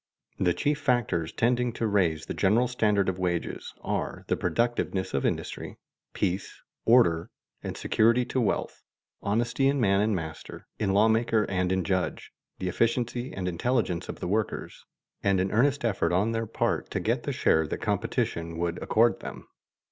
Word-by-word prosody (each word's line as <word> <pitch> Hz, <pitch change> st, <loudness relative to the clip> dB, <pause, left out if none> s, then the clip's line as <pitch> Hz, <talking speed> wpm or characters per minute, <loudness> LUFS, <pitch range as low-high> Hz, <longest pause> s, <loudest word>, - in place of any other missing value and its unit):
The 90 Hz, -2 st, +2 dB
chief 150 Hz, 0 st, 0 dB
factors 120 Hz, -, 0 dB
tending 120 Hz, +1 st, +1 dB
to 115 Hz, -, -2 dB
raise 95 Hz, -7 st, +1 dB
the -, -, -4 dB
general 115 Hz, +6 st, +3 dB
standard 105 Hz, -5 st, +1 dB
of 95 Hz, 0 st, -1 dB
wages 90 Hz, -2 st, -2 dB
are -, -, -3 dB
the -, -, +3 dB
productiveness 115 Hz, -5 st, -1 dB
of 70 Hz, -, +1 dB
industry, -, -, -4 dB, 0.4 s
peace, 95 Hz, +2 st, -2 dB, 0.2 s
order, 110 Hz, -9 st, +4 dB, 0.3 s
and -, -, -5 dB
security 115 Hz, +3 st, +3 dB
to 130 Hz, -, -1 dB
wealth, 105 Hz, -, -1 dB, 0.4 s
honesty 120 Hz, +5 st, +1 dB
in 140 Hz, 0 st, +2 dB
man 100 Hz, -4 st, +3 dB
and 105 Hz, 0 st, +1 dB
master, 80 Hz, -2 st, -7 dB
in 100 Hz, -3 st, +1 dB
lawmaker 110 Hz, +2 st, +3 dB
and 90 Hz, -1 st, 0 dB
in 95 Hz, 0 st, +1 dB
judge, 95 Hz, 0 st, -2 dB, 0.3 s
the 95 Hz, -, -3 dB
efficiency 120 Hz, +5 st, 0 dB
and 95 Hz, -1 st, -4 dB
intelligence 90 Hz, 0 st, -1 dB
of -, -, -6 dB
the -, -, -3 dB
workers, 105 Hz, +2 st, -2 dB, 0.4 s
and 100 Hz, -2 st, +2 dB
an 95 Hz, +1 st, 0 dB
earnest 135 Hz, +3 st, +2 dB
effort 105 Hz, -6 st, +1 dB
on 100 Hz, +6 st, +2 dB
their 115 Hz, 0 st, -2 dB
part -, -, -1 dB
to -, -, -2 dB
get -, -, 0 dB
the -, -, -3 dB
share 80 Hz, -1 st, +2 dB
that -, -, -3 dB
competition 85 Hz, 0 st, -2 dB
would 85 Hz, 0 st, -2 dB
accord 115 Hz, +1 st, +3 dB
them. -, -, -8 dB
105 Hz, 165 wpm, -27 LUFS, 90-120 Hz, 0.4 s, order